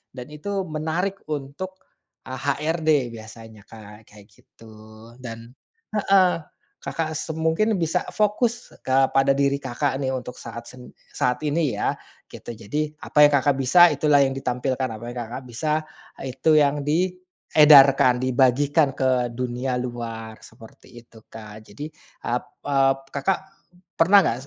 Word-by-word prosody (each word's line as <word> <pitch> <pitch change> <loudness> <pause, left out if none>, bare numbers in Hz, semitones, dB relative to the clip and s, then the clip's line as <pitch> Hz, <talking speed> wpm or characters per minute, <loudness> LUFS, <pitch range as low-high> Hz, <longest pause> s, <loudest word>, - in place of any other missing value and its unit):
dan 125 0 -8
itu 195 +6 -4
menarik 165 +5 -3
untuk, 150 +6 -5 0.5
eee, 130 -1 -7
HRD, 150 -2 0
biasanya, 110 -1 -12
Kak. 105 -1 -14
Kayak 105 -1 -17
gitu. 110 +2 -18 0.5
Dan 115 -1 -9 0.4
heeh. 195 -4 +3 0.4
Kakak 160 -1 -4
se 160 0 -4
mungkin 160 +7 +1
bisa 175 0 -1
fokus 220 +3 0
kepada 135 +1 +3
diri 140 0 +1
Kakak, 135 +1 -2
nih, 130 -1 -1
untuk 125 -1 -7
saat 115 0 -8
sen 125 -1 -13 0.2
saat 125 +3 -1
ini, 150 -1 0
ya. - - 0 0.4
Gitu. 120 - -9
Jadi, 115 +8 -3 0.2
apa 150 0 +5
yang 145 - -3
Kakak 140 0 +2
bisa, 170 +6 +6
itulah 145 -1 +3
yang 135 - 0
ditampilkan. 130 0 -2
Apa 110 -1 -8
yang 125 - -9
Kakak 125 +3 -7
bisa, 155 +6 -1 0.4
eee, 130 - -4
itu 160 -1 +4
yang 145 -1 +2
diedarkan, 150 -6 +4
dibagikan 135 +3 +2
ke 130 -2 +1
dunia 125 +1 -3
luar. 115 -3 -6
Seperti 115 +1 -17
itu, 115 -1 -18
Kak. 110 -1 -12
Jadi, 145 +9 -8 0.3
ap - - -2 0.2
ap 135 -1 +1
Kakak 160 +7 0 0.6
pernah 190 +3 +6
nggak, 115 - 0
135 Hz, 140 wpm, -23 LUFS, 125-155 Hz, 0.6 s, bisa